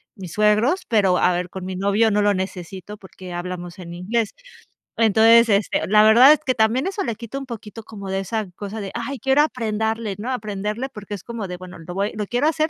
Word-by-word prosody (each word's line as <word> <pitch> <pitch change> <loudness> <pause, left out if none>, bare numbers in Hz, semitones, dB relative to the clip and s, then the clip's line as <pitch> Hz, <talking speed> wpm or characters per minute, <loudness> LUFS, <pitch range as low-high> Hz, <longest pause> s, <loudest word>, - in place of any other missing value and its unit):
mis 185 -5 -9
suegros, 215 - +3
pero, 195 -5 +3
a 180 - +3
ver, 180 0 -2
con 190 0 -7
mi 185 - -5
novio 205 +3 +2
no 210 0 +2
lo 205 0 +3
necesito 190 +2 -6
porque 185 -2 -11
hablamos 175 0 -6
en 170 -1 -8
inglés, 210 +5 -2 0.6
entonces, 225 +1 +6
este, 200 0 +1
la 210 +1 +5
verdad 245 +7 +8
es 310 - 0
que 255 - +2
también 225 +5 +2
eso 395 +1 -2
le 230 - -3
quita 235 +4 -6
un 275 - -7
poquito 225 -2 -8
como 200 -3 -9
de 195 - 0
esa 215 +3 -3
cosa 205 +1 -6
de: 195 - -6
"Ay, 270 +4 -4
quiero 270 +5 +3
aprenderle, 220 -6 -1
¿no?, 230 +5 -4
aprenderle", 210 +2 -3
porque 210 -4 -9
es 190 - -11
como 230 -4 -5
de: 180 - -5
"Bueno, 180 0 -10
lo 170 +2 -8
voy 200 +2 -1
lo 210 -2 -3
quiero 245 +5 +1
hacer, 315 0 +1
210 Hz, 220 wpm, -22 LUFS, 190-230 Hz, 0.6 s, verdad